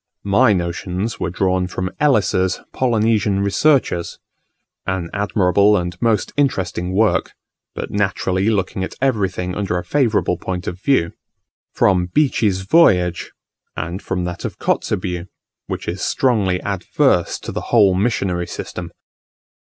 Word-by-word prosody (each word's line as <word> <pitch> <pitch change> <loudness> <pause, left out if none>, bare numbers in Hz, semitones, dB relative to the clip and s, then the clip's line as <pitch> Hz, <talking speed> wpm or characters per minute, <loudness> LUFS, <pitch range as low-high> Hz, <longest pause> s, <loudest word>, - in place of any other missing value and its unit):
My 110 +4 +4
notions 90 +3 -2
were - - -1
drawn 95 0 0
from 90 0 -4
Ellis's 100 -9 +2
"Polynesian 110 -5 +1
Researches" 100 - +1 0.7
an 90 -3 -2
admirable 100 0 +3
and 85 -1 -3
most 115 -2 +1
interesting 95 -10 0
work, 110 +1 +2 0.4
but - - -5
naturally 95 -1 0
looking 95 -3 -1
at - - -5
everything 95 -8 0
under 95 -3 -1
a 90 - -3
favourable 120 -1 +1
point 90 -1 -4
of 90 +2 -5
view, 105 -12 +2 0.6
from 90 -2 +3
Beechey's 105 -5 +1
Voyage; 95 - +3 0.5
and 85 +4 -4
from 90 -1 -3
that 90 0 -5
of - - -5
Kotzebue, 90 -1 -1 0.4
which - - -5
is 90 +2 -3
strongly 105 -8 +1
adverse 100 - +1
to - - -7
the - - -4
whole 105 -5 +5
missionary 95 -3 0
system. 85 -1 -6
95 Hz, 130 wpm, -19 LUFS, 90-110 Hz, 0.7 s, whole